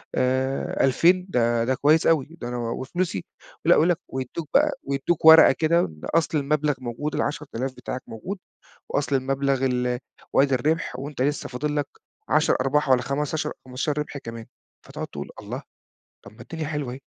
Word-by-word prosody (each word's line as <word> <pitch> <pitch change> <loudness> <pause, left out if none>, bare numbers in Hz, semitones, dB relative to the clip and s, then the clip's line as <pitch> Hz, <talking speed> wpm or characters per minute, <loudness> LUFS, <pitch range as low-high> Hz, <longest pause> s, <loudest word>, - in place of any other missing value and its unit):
آآ 130 +1 0
2000 175 +7 +4
ده 120 -3 +2
ده 130 - +1
كويس 155 +4 +3
أوي 155 -4 +3
ده 120 - -4
أنا 125 0 -4
وفلوسي"، 130 - -3 0.4
ولأ - - +7
ويقول 165 +3 +4
لك 175 - +2
ويدّوك 130 +4 -5
بقى 300 +1 +5
ويدّوك 140 +4 -1
ورقة 160 0 +10
كده 170 +2 +2
بأصل 155 - -1
المبلغ 150 +1 +1
موجود 130 +5 -4
ال10000 135 -3 -3
بتاعك 130 - -6
موجود، 185 - -6 0.5
وأصل 140 -1 +1
المبلغ 135 0 0
ال 125 -1 0 0.3
وادي 135 -1 +4
الربح 155 +1 0
وأنت 140 -1 -4
لسه 145 +2 -1
فاضل 150 +4 -2
لك 145 - 0 0.4
10 - - +3
أرباح 140 +2 +1
والّا 125 -1 +4
خمستاشر 145 +4 -2
15 135 +4 -2
ربح 150 -1 -4
كمان، 115 -3 -8 0.4
فتقعد - - -6
تقول: - - -7
"الله؟! - - -6 0.6
طب 100 - -11
ما - - -14
الدنيا 160 -2 -5
حلوة 150 -4 -3
أهيه 130 - -7
140 Hz, 165 wpm, -24 LUFS, 125-150 Hz, 0.6 s, ورقة